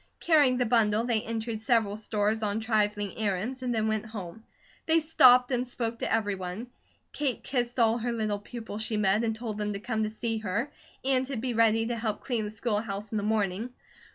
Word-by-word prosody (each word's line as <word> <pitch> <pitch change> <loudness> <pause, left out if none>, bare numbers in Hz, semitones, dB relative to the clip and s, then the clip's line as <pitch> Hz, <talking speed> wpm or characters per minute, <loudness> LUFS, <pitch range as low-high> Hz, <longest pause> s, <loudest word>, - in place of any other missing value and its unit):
Carrying 290 -6 +4
the 250 - +1
bundle, 220 -2 +3
they 235 -3 +1
entered 225 0 -4
several 220 -4 +2
stores 215 0 -1
on 210 0 -1
trifling 210 -3 0
errands, 215 +5 -2
and 250 -1 -2
then 220 -2 0
went 220 0 -1
home. 215 -1 -8 0.4
They 325 0 +5
stopped 260 -6 +6
and 250 0 0
spoke 230 -1 -3
to - - -2
everyone. 205 +1 -2 0.4
Kate 280 -4 -2
kissed 245 -2 -2
all 230 -1 +3
her 240 +1 -2
little 215 -3 -1
pupils 220 -1 -7
she 220 0 -1
met, 205 +2 +2
and 225 -1 0
told 220 -2 -5
them 210 0 -1
to 200 - -4
come 220 +1 -2
to 215 - 0
see 225 +1 -3
her, 220 +7 -2 0.3
and 260 -1 +2
to 275 - -3
be 245 +2 -2
ready 225 0 +3
to 240 +1 -2
help 220 -2 -3
clean 235 -4 -1
the - - -4
schoolhouse 210 -1 -3
in 220 - -1
the 205 - -1
morning. 215 +2 -1
220 Hz, 205 wpm, -28 LUFS, 210-245 Hz, 0.4 s, stopped